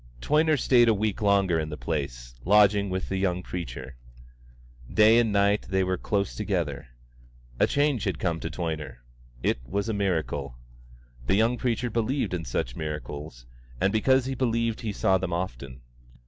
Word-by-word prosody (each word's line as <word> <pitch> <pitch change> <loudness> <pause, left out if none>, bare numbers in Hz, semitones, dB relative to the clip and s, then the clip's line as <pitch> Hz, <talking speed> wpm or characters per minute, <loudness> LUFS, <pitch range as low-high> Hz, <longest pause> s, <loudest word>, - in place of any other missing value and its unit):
Toyner 155 - +2
stayed 120 -2 +4
a 110 - +4
week 105 +1 -2
longer 100 -5 +3
in 80 -1 -3
the 75 - -6
place, 70 -7 -4
lodging 100 +1 +4
with 95 0 -3
the 95 - -2
young 90 -2 0
preacher. 65 -8 -6 0.9
Day 110 +2 +6
and 115 -2 +2
night 100 +1 +2
they 95 0 +2
were 95 0 0
close 100 +1 -1
together. 85 -11 -2 0.7
A - - +4
change 145 -5 +1
had - - -1
come 85 -3 -1
to - - -4
Toyner. 75 -8 -5 0.4
It - - +1
was 100 - -3
a - - 0
miracle. 80 -10 -2 0.7
The - - +3
young 115 +4 +3
preacher 120 -1 -1
believed 120 +2 -1
in 85 -2 -3
such - - -3
miracles, 75 -4 -6 0.3
and 100 - +1
because 130 +4 +3
he 135 - -2
believed 115 -3 0
he 110 - -3
saw 95 -1 +2
them 90 -1 -3
often. 65 -7 -5
95 Hz, 165 wpm, -26 LUFS, 80-110 Hz, 0.9 s, Day